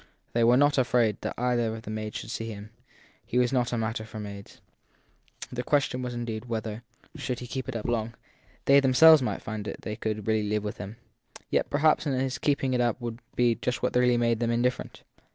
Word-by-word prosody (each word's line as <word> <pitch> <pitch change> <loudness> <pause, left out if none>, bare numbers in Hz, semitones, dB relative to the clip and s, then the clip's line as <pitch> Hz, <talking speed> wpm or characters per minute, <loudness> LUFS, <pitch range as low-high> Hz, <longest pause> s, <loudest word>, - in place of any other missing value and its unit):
They 115 - +2
were 120 +2 +6
not 145 0 +4
afraid 120 -4 +2
that - - -4
either 120 -2 0
of 110 - -9
the 110 - -6
maids 110 0 -4
should - - -7
see 115 -1 -4
him 105 0 -9 0.5
he 125 - -3
was 125 +1 +2
not 125 -2 +1
a 120 - -1
matter 110 0 -2
for 110 0 -9
maids. 100 -1 -9 0.9
The 125 - -3
ques 140 +3 +2
tion 125 0 -4
indeed 120 -2 -4
was - - -14
whether 110 -1 -3 0.4
should 125 - -3
he 125 - -7
keep 130 +2 -5
it 125 - -5
up 110 - -4
long 115 -1 -1 0.5
they 140 +1 +7
themselves 140 +3 +7
would 125 - -2
find 110 -2 -5
that - - -6
they 105 - -4
could 110 -2 -3
really 110 -2 +1
live 105 0 0
witli 105 - -4
him. 100 +4 -7 0.6
Yet - - +1
perhaps 155 +2 +3
his 130 -2 -1
keeping 140 -3 +1
it 125 - +2
up 120 0 +1
would 120 -1 -5 0.2
be 120 -1 +3
just 125 +3 -3
what 125 - 0
would 125 -1 +4
make 115 -1 +1
them 115 -1 0
indifferent. 125 +2 -1
120 Hz, 220 wpm, -27 LUFS, 110-125 Hz, 0.9 s, they